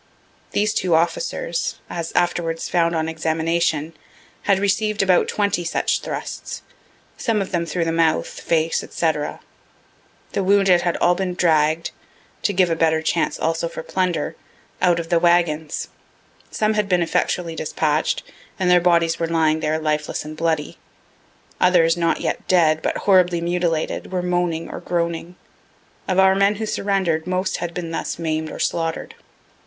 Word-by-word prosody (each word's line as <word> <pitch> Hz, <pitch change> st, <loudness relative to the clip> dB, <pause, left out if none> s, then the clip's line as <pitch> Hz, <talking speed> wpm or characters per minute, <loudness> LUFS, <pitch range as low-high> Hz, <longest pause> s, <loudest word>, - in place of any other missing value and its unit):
These 210 Hz, +1 st, +1 dB
two 180 Hz, -5 st, +1 dB
officers, 165 Hz, 0 st, -1 dB
as 170 Hz, -1 st, -5 dB
afterwards 170 Hz, -2 st, 0 dB
found 170 Hz, -1 st, +1 dB
on 160 Hz, 0 st, 0 dB
examination, 160 Hz, 0 st, 0 dB, 0.6 s
had 195 Hz, -, +5 dB
receiv'd 205 Hz, +1 st, +1 dB
about 185 Hz, -2 st, +3 dB
twenty 200 Hz, -4 st, 0 dB
such 170 Hz, -, 0 dB
thrusts, -, -, -6 dB, 0.5 s
some 225 Hz, -3 st, 0 dB
of 195 Hz, -, -3 dB
them 170 Hz, -2 st, -1 dB
through 165 Hz, +1 st, -1 dB
the 165 Hz, -, 0 dB
mouth, 165 Hz, -1 st, +2 dB
face, 165 Hz, 0 st, 0 dB
&c. 165 Hz, -2 st, +1 dB, 1.2 s
The 200 Hz, -, -1 dB
wounded 195 Hz, -2 st, +4 dB
had 175 Hz, -1 st, 0 dB
all 175 Hz, -, +3 dB
been 180 Hz, 0 st, -2 dB
dragg'd 160 Hz, -2 st, +2 dB, 0.5 s
(to -, -, +1 dB
give 185 Hz, -3 st, +2 dB
a -, -, +2 dB
better 160 Hz, -1 st, +2 dB
chance 165 Hz, +1 st, 0 dB
also 165 Hz, +1 st, 0 dB
for -, -, -7 dB
plunder,) 180 Hz, -5 st, -1 dB, 0.5 s
out 175 Hz, -1 st, +3 dB
of 165 Hz, -1 st, -5 dB
their 170 Hz, -2 st, +3 dB
wagons; 165 Hz, -3 st, +1 dB, 0.6 s
some 215 Hz, 0 st, 0 dB
had 210 Hz, -2 st, 0 dB
been 180 Hz, -2 st, +3 dB
effectually 165 Hz, 0 st, -1 dB
dispatch'd, 155 Hz, 0 st, 0 dB, 0.3 s
and 180 Hz, -1 st, +2 dB
their 180 Hz, 0 st, +6 dB
bodies 170 Hz, -1 st, +2 dB
were 165 Hz, -, 0 dB
lying 160 Hz, -1 st, +2 dB
there 155 Hz, 0 st, 0 dB
lifeless 155 Hz, -1 st, -2 dB
and 155 Hz, 0 st, -7 dB
bloody. 160 Hz, -2 st, -1 dB, 0.8 s
Others, 165 Hz, -3 st, +4 dB
not 170 Hz, -1 st, 0 dB
yet -, -, -3 dB
dead, 160 Hz, -4 st, +3 dB
but -, -, -1 dB
horribly 180 Hz, -3 st, +4 dB
mutilated, 170 Hz, -1 st, -1 dB
were 180 Hz, -1 st, -1 dB
moaning 175 Hz, -2 st, -1 dB
or -, -, -7 dB
groaning. 170 Hz, 0 st, -2 dB, 0.7 s
Of 185 Hz, -, 0 dB
our 190 Hz, 0 st, +6 dB
men 200 Hz, +2 st, +3 dB
who 220 Hz, +2 st, -3 dB
surrender'd, 190 Hz, -6 st, 0 dB
most 185 Hz, +1 st, -1 dB
had 170 Hz, -, -4 dB
been 170 Hz, -2 st, -4 dB
thus -, -, -3 dB
maim'd 160 Hz, -1 st, -2 dB
or -, -, -7 dB
slaughter'd. 165 Hz, -1 st, -2 dB
170 Hz, 155 wpm, -21 LUFS, 160-180 Hz, 1.2 s, their